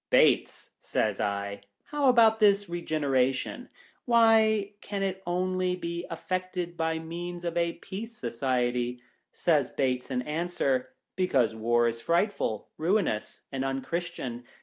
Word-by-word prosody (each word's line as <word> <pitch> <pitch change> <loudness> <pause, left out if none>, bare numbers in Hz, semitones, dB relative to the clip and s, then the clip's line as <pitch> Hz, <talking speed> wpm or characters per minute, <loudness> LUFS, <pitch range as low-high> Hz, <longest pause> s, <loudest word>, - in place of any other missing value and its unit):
" - - -62
Bates," - - +3
says 105 -2 -1
I, 100 0 -2
" 100 - -50
how 290 -2 +3
about 225 -3 +5
this 205 -1 +5
Begeneration? 155 - 0 0.4
Why 220 -3 +4
can 200 -1 -3
it 190 -1 -2
only 185 +1 0
be 170 -1 -4
effected 180 0 -3
by 160 -1 0
means 175 +2 -6
of 170 0 -2
a 170 0 +1
Peace 220 +4 -8
Society 120 0 0
1 125 - -19
" - - -46
Says 150 -7 +2
Bates 125 -1 -1
in 125 -1 -1
answer, 150 -4 -1
" - - -58
Because 135 -12 +2
War 120 +2 +2
is 115 0 -3
frightful, 170 - 0
ruinous, 165 - 0
and 135 -1 -2
unchristian. 135 -2 -3
170 Hz, 145 wpm, -28 LUFS, 125-190 Hz, 0.4 s, about